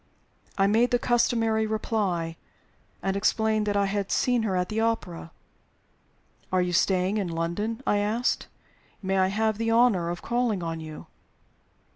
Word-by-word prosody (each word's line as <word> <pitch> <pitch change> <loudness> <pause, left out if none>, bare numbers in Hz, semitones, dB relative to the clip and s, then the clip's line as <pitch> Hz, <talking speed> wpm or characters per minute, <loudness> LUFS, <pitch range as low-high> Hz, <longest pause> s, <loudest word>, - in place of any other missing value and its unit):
I 195 - +4
made 225 +5 +3
the 245 - +3
customary 230 -2 +1
reply, 200 -7 -1 0.7
and 195 0 0
explained 215 +1 +1
that 205 0 +1
I 200 - +3
had 200 0 -2
seen 245 -2 +2
her 205 -4 -1
at 180 0 0
the 215 - -1
opera. 225 -8 -2 1.2
"Are 185 - +2
you 180 0 0
staying 185 +3 +2
in 200 -3 -1
London?" 175 +9 -3
I 205 - +2
asked. 220 +4 0 0.6
"May 190 0 +1
I 185 - +4
have 215 +2 0
the 230 0 0
honor 225 -7 +3
of 175 0 -5
calling 235 -6 0
on 165 -1 -3
you?" 155 -1 -9
205 Hz, 155 wpm, -26 LUFS, 180-225 Hz, 1.2 s, I